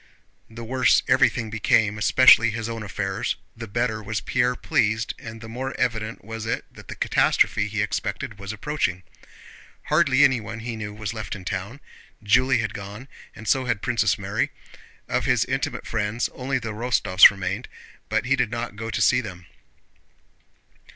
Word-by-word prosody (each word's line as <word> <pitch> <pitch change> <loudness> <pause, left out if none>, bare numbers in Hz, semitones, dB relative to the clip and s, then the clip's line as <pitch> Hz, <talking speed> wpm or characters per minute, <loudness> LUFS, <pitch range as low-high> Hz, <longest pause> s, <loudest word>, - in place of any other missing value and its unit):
The 115 +1 -9
worse 130 +2 +3
everything 110 -2 +2
became, 105 -1 +2
especially 115 0 +6
his 115 0 -4
own 115 -1 -5
affairs, 95 -2 -3 0.2
the 115 0 -8
better 110 0 -1
was 105 0 -3
Pierre 125 0 0
pleased 110 -2 0
and 110 0 -9
the 110 - -9
more 130 +4 -5
evident 110 -3 -2
was 110 0 -6
it - - -2
that - - -14
the - - -7
catastrophe 110 -2 +2
he 105 0 -1
expected 105 0 -4
was 100 +1 -5
approaching. 110 -6 -2 0.9
Hardly 140 +1 +4
anyone 115 -4 +1
he 120 0 -5
knew 105 -2 -5
was 105 0 -5
left 110 -2 -5
in 95 -2 -10
town. 100 +9 -5 0.4
Julie 125 +4 +3
had 110 -1 -3
gone, 105 +6 -8 0.3
and 110 0 -10
so 130 -1 +2
had 105 -5 -2
Princess 120 -2 +1
Mary. - - -1 0.6
Of - - -1
his - - +2
intimate - - -3
friends 115 +1 -1
only 135 +1 -2
the 115 -3 -5
Rostóvs 105 -4 +6
remained, 95 +4 -4 0.4
but - - 0
he 135 +2 +3
did 125 -4 0
not 115 -3 -4
go 115 +2 -5
to - - -2
see 125 0 +4
them. 90 -6 -9
110 Hz, 165 wpm, -24 LUFS, 105-120 Hz, 0.9 s, especially